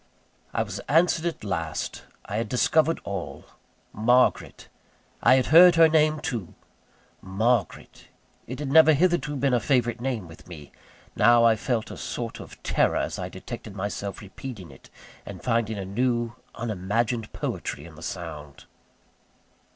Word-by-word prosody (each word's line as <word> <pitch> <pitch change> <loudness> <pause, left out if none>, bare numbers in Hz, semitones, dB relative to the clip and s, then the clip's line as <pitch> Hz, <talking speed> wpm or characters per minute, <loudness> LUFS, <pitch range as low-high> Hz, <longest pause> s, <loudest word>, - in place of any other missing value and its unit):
I - - 0
was - - -7
answered 165 +2 +3
at 165 - -5
last: 80 -6 -4 0.2
I 100 - -4
had 115 -1 -2
discovered 155 +7 +2
all. 100 -3 -6 0.5
Margaret! 120 +4 +1 0.5
I 130 - +6
had 130 -1 +2
heard 175 +1 +9
her 165 -1 +7
name, 155 -1 +2
too. 120 - -5 0.7
Margaret! 105 +1 -2 0.4
it 130 - -6
had 140 -2 -4
never 160 +1 +7
hitherto 170 -1 +1
been 135 -1 0
a 120 - +3
favourite 120 -2 0
name 120 -8 -3
with 80 +1 -15
me. 80 -5 -11 0.4
Now 120 0 +5
I 115 -1 +5
felt 115 0 -2
a - - -8
sort - - -5
of - - -12
terror - - +1
as - - -3
I - - -4
detected 100 - -9
myself 100 0 -5
repeating 100 - -9
it, 65 - -17 0.3
and 95 -3 -10
finding 115 -3 0
a 95 - -5
new, 120 +3 -1 0.2
unimagined 115 +1 -2
poetry 75 - -5
in 85 - -12
the 75 - -14
sound. 75 -7 -7
115 Hz, 150 wpm, -25 LUFS, 100-135 Hz, 0.7 s, heard